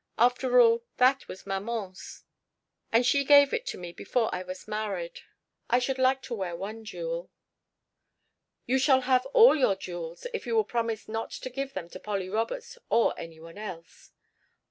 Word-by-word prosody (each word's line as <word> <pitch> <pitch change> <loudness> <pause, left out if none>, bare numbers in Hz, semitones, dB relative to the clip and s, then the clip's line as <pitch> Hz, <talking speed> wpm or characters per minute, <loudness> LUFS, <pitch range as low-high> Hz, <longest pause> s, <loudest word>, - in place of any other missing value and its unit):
After 250 +1 +3
all, 230 -1 +5
that 260 +2 +3
was 185 - -10
maman's, 195 -1 -5 0.7
and 230 +2 +4
she 280 +2 +3
gave 285 0 +6
it - - -2
to - - -4
me 175 -1 -7
before 225 +4 -1
I 180 - -2
was 185 0 -8
married. 200 -5 -4 0.5
I 240 - +4
should 260 +1 -1
like 260 0 +3
to 255 - -6
wear 190 -6 -3
one 215 +5 -6
jewel." - - -5 1.4
"You 265 +2 +2
shall 265 -1 +4
have 255 0 +2
all 455 - +7
your 255 -9 +3
jewels, 175 -3 -7
if 460 - -4
you 460 - 0
will 440 - +4
promise 230 - -2
not 225 +1 -3
to 255 - -7
give 275 +1 -5
them 180 -3 -4
to 185 - -8
Polly 195 -3 -3
Roberts 475 - -3
or 235 - +3
any 165 -1 -9
one 165 +4 -12
else." 175 -6 -9
230 Hz, 175 wpm, -28 LUFS, 190-265 Hz, 1.4 s, all